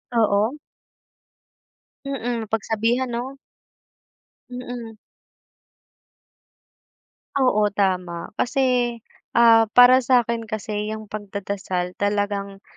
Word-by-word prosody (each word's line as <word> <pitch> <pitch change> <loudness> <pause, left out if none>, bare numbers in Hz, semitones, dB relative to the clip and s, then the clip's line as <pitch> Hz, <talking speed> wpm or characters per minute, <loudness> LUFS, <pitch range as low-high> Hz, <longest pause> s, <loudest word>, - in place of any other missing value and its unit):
Oo. 220 +4 +2 1.5
Mm, 245 -4 -3
mapagsabihan 225 +4 -1
'no? 250 +3 -5 1.1
Mm. 245 -3 -7 2.4
Oo, 250 -6 +3
tama, 180 -4 -1
kasi, 250 -2 +1 0.4
ah, 230 -1 +6
para 245 +1 +8
sa'kin 235 -3 +1
kasi, 210 -1 -4
'yung 215 -1 -8
pagdadasal 200 -3 -4
talagang, 205 -1 -2
225 Hz, 70 wpm, -22 LUFS, 205-245 Hz, 2.4 s, para